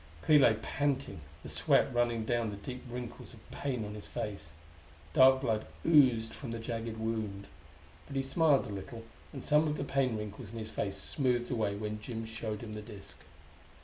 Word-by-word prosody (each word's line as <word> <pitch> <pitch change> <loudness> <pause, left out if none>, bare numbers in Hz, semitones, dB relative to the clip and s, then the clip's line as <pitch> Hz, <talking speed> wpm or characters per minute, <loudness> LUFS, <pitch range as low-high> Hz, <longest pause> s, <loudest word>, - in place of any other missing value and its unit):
Clee 150 -1 +7
lay 115 -5 +6
panting, 135 - -1 0.2
the - - -7
sweat - - +3
running 120 -2 +1
down 120 -1 +1
the 105 - -5
deep 125 +5 -7
wrinkles 120 0 -7
of 110 - -18
pain 125 -6 -2
on 105 - -6
his 105 -1 -8
face. 100 -7 -4 0.6
Dark 130 0 +7
blood 110 -5 0 0.2
oozed 125 -8 +5
from 135 - -7
the 115 - -3
jagged 115 -1 -4
wound. 110 -3 -3 0.6
But 140 - -8
he 135 - +1
smiled 145 0 +3
a - - -7
little, 115 +4 -7 0.3
and 135 - -7
some 150 +1 +4
of 150 0 -1
the - - -2
pain 135 -4 +1
wrinkles 105 +1 -7
in - - -6
his 110 -1 -4
face 100 -2 -2
smoothed 120 +3 0
away, 110 -4 0
when 105 +1 -4
Jim 115 -1 -5
showed 110 -1 -4
him 110 -2 -7
the 105 - -5
disk.... 105 -2 -10
115 Hz, 190 wpm, -32 LUFS, 105-130 Hz, 0.6 s, Clee